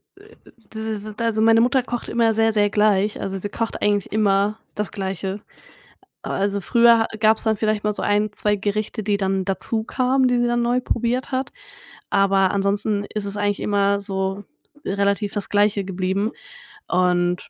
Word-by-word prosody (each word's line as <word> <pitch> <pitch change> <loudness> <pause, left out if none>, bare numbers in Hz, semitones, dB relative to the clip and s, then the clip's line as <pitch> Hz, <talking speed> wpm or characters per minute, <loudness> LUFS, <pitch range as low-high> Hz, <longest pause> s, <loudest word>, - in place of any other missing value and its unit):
äh, 415 +3 -18 0.4
diese 220 -1 -4
w 215 - -7
also, 230 -2 0
meine 225 0 +5
Mutter 255 +1 +2
kocht 240 -1 -5
immer 230 -1 +2
sehr, 225 +1 +2
sehr 205 -1 +2
gleich, 210 -1 +2
also 195 0 -3
sie 205 +2 -5
kocht 230 +1 -4
eigentlich 205 -2 0
immer 205 0 +2 0.2
das 210 -1 -3
Gleiche. 195 0 -4 0.8
Aber - - -4
also, 200 0 0
früher 235 +2 +4
gab's 220 0 +3
dann 220 -1 +2
vielleicht 215 -1 -1
mal 210 - +1
so - - -4
1, 210 0 +1
2 210 0 0
Gerichte, 210 +1 -3
die 205 -1 +1
dann 195 -1 -1
dazukamen, 250 +6 0
die 245 -1 +2
sie 240 - +2
dann 240 0 +1
neu 245 +1 +1
probiert 245 +2 -1
hat, 260 0 -2 0.6
aber 195 -1 +3
ansonsten 200 +1 0
ist 210 -1 -3
es 200 0 -5
eigentlich 205 0 -1
immer 200 -1 +1
so 195 0 -3 0.4
relativ 200 +1 0
das 205 -2 -2
Gleiche 205 -1 +2
geblieben. 190 +3 -1 0.6
Und 180 -1 +1
210 Hz, 170 wpm, -22 LUFS, 200-225 Hz, 0.8 s, meine